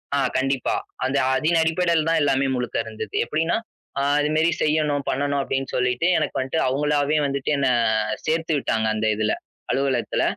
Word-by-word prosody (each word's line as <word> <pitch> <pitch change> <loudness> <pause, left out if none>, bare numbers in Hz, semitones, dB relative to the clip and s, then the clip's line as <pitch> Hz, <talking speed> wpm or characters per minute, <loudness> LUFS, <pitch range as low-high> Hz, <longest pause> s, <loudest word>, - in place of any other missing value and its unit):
ஆ, - - +2 0.2
கண்டிப்பா. 135 -1 0 0.3
அந்த 135 +1 0 0.2
அதின் 160 +4 +2
அடிப்படையில் 165 -1 +1
தான் 165 - +3
எல்லாமே 135 -1 +2
முழுக்க 125 -1 -3
இருந்தது. 110 -2 -7
எப்பிடின்னா, 160 - 0 0.4
ஆ, - - +1 0.2
இது 150 - 0
மாதிரி 160 +2 +3
செய்யணும், 150 -2 +1
பண்ணணும் 140 +1 0
அப்பிடின்னு 135 -1 -2
சொல்லிட்டு 125 +5 +1
எனக்கு - - -1
வந்துட்டு 135 +5 -1
அவுங்களாவே 145 +2 +1
வந்துட்டு 140 0 -2
என்ன 140 -1 +1 0.6
சேர்த்துவிட்டாங்க. 155 -8 0
அந்த 110 0 0
இதுல 110 0 0 0.4
அலுவலகத்துல. 135 -1 0
140 Hz, 150 wpm, -23 LUFS, 130-155 Hz, 0.6 s, தான்